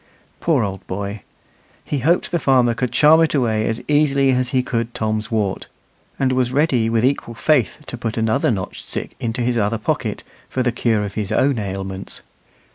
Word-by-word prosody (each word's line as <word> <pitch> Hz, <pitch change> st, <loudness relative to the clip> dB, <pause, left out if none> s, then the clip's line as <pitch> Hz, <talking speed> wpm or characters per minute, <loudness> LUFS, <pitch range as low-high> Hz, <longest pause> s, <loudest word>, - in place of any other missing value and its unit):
Poor 150 Hz, -8 st, +2 dB
old 95 Hz, -2 st, -5 dB
boy! 100 Hz, +2 st, -4 dB, 0.6 s
He 145 Hz, -, -2 dB
hoped 165 Hz, +7 st, +1 dB
the 175 Hz, -, +1 dB
farmer 130 Hz, -4 st, +3 dB
could 120 Hz, +2 st, -2 dB
charm 155 Hz, +2 st, +6 dB
it 160 Hz, -1 st, +2 dB
away 110 Hz, -5 st, +1 dB
as 115 Hz, -, -2 dB
easily 140 Hz, -2 st, +3 dB
as 125 Hz, -1 st, +1 dB
he 130 Hz, -1 st, +1 dB
could 115 Hz, -1 st, -2 dB
Tom's 110 Hz, 0 st, -1 dB
wart, 105 Hz, -4 st, -1 dB, 0.5 s
and 130 Hz, -1 st, +1 dB
was 130 Hz, -1 st, +1 dB
ready 130 Hz, -5 st, +2 dB
with 115 Hz, +1 st, +2 dB
equal 130 Hz, -3 st, -1 dB
faith 150 Hz, +1 st, +1 dB
to 125 Hz, -, -7 dB
put 115 Hz, -1 st, -3 dB
another 110 Hz, -1 st, +1 dB
notched 95 Hz, -5 st, -4 dB
stick -, -, -5 dB
into 115 Hz, +2 st, -2 dB
his 120 Hz, 0 st, +1 dB
other 105 Hz, +2 st, +1 dB
pocket, 110 Hz, -, -2 dB, 0.3 s
for 130 Hz, -, -1 dB
the 125 Hz, -, +1 dB
cure 110 Hz, -3 st, +1 dB
of 100 Hz, -, -6 dB
his 105 Hz, -3 st, -3 dB
own 135 Hz, -3 st, +2 dB
ailments. 95 Hz, -1 st, -5 dB
120 Hz, 190 wpm, -20 LUFS, 110-135 Hz, 0.6 s, charm